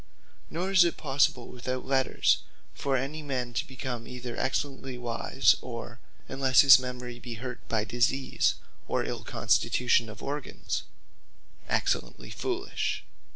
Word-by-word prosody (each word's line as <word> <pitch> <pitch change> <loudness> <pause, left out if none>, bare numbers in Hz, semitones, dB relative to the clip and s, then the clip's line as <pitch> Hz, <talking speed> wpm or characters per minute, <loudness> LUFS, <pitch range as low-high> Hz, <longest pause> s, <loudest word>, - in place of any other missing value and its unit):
Nor 180 +4 -2
is 185 -2 +7
it 170 - 0
possible 135 -4 +1
without 125 +1 -4
Letters 130 0 +2 0.3
for 135 -1 0
any 140 +5 -3
man 130 -4 -3
to - - -1
become 130 -3 -5
either 125 -1 -6
excellently 135 -1 -2
wise, 120 -1 +2
or - - -7 0.3
(unless 135 -1 +5
his 135 -2 +9
memory 125 -1 -6
be 120 -1 -7
hurt 125 +2 -6
by 110 -2 +1
disease, 120 +4 +1 0.3
or - - 0
ill - - -4
constitution 120 -2 +2
of 110 - -10
organs) 145 +1 -3 0.8
excellently - - -1
foolish. 380 +1 -2
130 Hz, 130 wpm, -28 LUFS, 120-140 Hz, 0.8 s, his